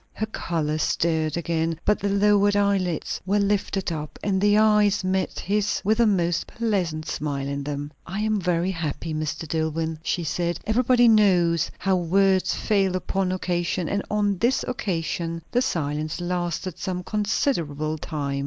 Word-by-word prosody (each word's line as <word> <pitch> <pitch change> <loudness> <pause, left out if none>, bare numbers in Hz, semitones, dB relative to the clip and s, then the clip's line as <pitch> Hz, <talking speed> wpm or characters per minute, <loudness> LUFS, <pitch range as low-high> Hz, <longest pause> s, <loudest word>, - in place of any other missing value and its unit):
Her 220 - -2
colour 160 -7 -2
stirred 160 0 0
again, 165 -1 -1
but 210 - +3
the 200 - -1
lowered 205 0 +3
eyelids 195 -5 0
were 195 +3 +1
lifted 200 -2 0
up, 150 -2 -5
and 190 -2 +1
the 205 0 +4
eyes 210 -2 +4
met 185 0 -1
his 210 +1 0
with 215 +3 +2
a 235 - +5
most 175 -4 0
blessed 185 -9 -1
smile 145 -3 -3
in 140 0 -3
them. 145 0 -4 0.2
"I 195 +4 -3
am 215 -2 0
very 175 +1 +1
happy, 165 -2 -4
Mr. 155 +1 -3
Dillwyn," 160 0 -2
she 170 +1 -1
said. 170 +2 -1
Everybody 245 +2 +4
knows 180 -7 +4
how 190 -1 +1
words 190 +2 +2
fail 195 -4 +1
upon 185 0 -1
occasion; 175 -1 -1
and 200 +4 -1
on 205 -3 0
this 245 +3 +1
occasion 165 -7 -3
the 245 - +2
silence 155 - -2
lasted 175 0 -3
some 180 -1 -3
considerable 165 - -1
time. 140 -3 -3
180 Hz, 155 wpm, -24 LUFS, 160-205 Hz, 0.2 s, a